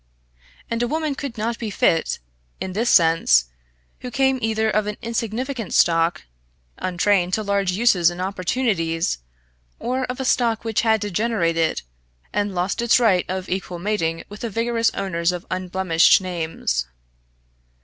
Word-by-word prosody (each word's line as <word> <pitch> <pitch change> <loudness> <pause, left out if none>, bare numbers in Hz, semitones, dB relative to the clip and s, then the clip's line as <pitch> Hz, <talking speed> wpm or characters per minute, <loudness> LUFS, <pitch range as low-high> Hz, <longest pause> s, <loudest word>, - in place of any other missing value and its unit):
And 230 0 -2
a 240 - +1
woman 310 +2 -1
could 270 -3 -6
not 230 +2 -2
be 225 - -3
fit, 165 -4 +1 0.4
in 185 - -4
this 230 +5 0
sense, 160 - +5 0.5
who 250 - -6
came 265 0 +1
either 220 0 0
of 215 -1 +1
an 210 - -4
insignificant 230 0 -3
stock, 165 - +3 0.6
untrained 185 0 +1
to 215 - -3
large 200 -2 0
uses 185 -5 +4
and 175 0 -8
opportunities, 185 - -1 0.6
or 255 +2 -2
of 250 +1 -6
a 265 - -2
stock 230 -3 +1
which 225 -2 +1
had 220 -2 +2
degenerated, 185 -5 0 0.5
and 205 -2 -1
lost 180 +5 -1
its 235 +1 +4
right 200 -7 +3
of 185 0 -3
equal 185 -1 -3
mating 170 -4 -1
with 205 +1 -10
the 235 - -3
vigorous 230 +1 +1
owners 170 -3 0
of 180 0 -6
unblemished 185 -2 +3
names. 165 - -2
200 Hz, 150 wpm, -22 LUFS, 175-230 Hz, 0.6 s, sense